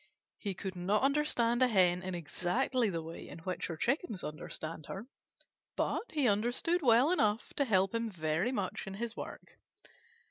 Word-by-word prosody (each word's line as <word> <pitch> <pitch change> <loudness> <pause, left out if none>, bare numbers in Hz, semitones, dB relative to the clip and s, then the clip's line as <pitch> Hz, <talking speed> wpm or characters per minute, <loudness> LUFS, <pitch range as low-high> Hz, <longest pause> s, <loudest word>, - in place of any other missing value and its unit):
He 200 -3 -3
could 190 0 -5
not 195 +6 +1
understand 270 -4 +2
a 255 - +7
Hen 180 -5 +4
in 185 -1 -4
exactly 215 - 0
the 165 -3 -3
way 165 +1 -8
in - - -8
which 180 +2 -3
her 165 - -5
Chickens 235 - -1
understand 155 +1 -6
her, 195 +3 -6 0.7
but 475 - -1
he 290 -5 +3
understood 245 - +1
well 250 +3 +5
enough 215 -10 +1
to 280 - +1
help 195 -4 +3
him 230 0 -1
very 160 +3 0
much 200 -7 -3
in 195 - -5
his 230 +2 -4
work. - - -8
205 Hz, 170 wpm, -33 LUFS, 180-245 Hz, 0.7 s, a